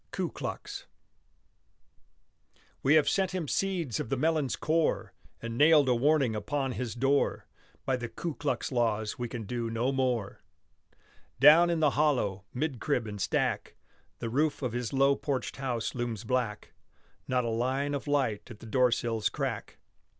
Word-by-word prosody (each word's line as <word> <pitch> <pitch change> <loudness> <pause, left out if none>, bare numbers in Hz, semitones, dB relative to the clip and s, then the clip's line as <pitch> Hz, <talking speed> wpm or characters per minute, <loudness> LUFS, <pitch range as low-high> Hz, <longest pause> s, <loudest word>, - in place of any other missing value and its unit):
KU - - -3
KLUX - - -6 1.9
We 140 +3 +4
have 155 - +4
sent 190 -1 +1
him 170 -5 -2
seeds 175 - -1
of - - -4
the 135 - 0
melon's 155 -2 +1
core, 160 +1 0 0.3
And 115 0 -4
nailed 150 -2 +6
a 125 - +4
warning 135 -1 +2
upon 135 +5 -2
his 125 -2 -4
door; 135 +3 +1 0.4
By 130 -1 +1
the 120 -1 -5
Ku 160 +8 -4
Klux 140 -3 -2
laws 110 -3 0
we 120 -1 -3
can 115 -1 -5
do 115 +2 -3
no 115 +4 0
more. 125 -6 -1 1.0
Down 155 +5 +8
in 170 -2 0
the 150 -2 +4
hollow, 125 -10 +1
'mid 135 -1 -2
crib 135 -6 0
and 105 -2 -6
stack, - - -1 0.4
The 115 -2 -4
roof 145 +3 0
of 125 -3 -2
his 120 -2 -3
low 135 +1 +4
porched 140 -3 -3
house 125 -5 -2
looms 120 -4 -3
black, 125 -5 -2 0.5
Not 125 -1 +1
a - - -1
line 130 +5 0
of 140 +1 -4
light 135 -8 0
at 110 -3 -10
the - - -11
doorsill's 120 -2 +1
crack. - - -4
130 Hz, 160 wpm, -29 LUFS, 115-145 Hz, 1.9 s, Down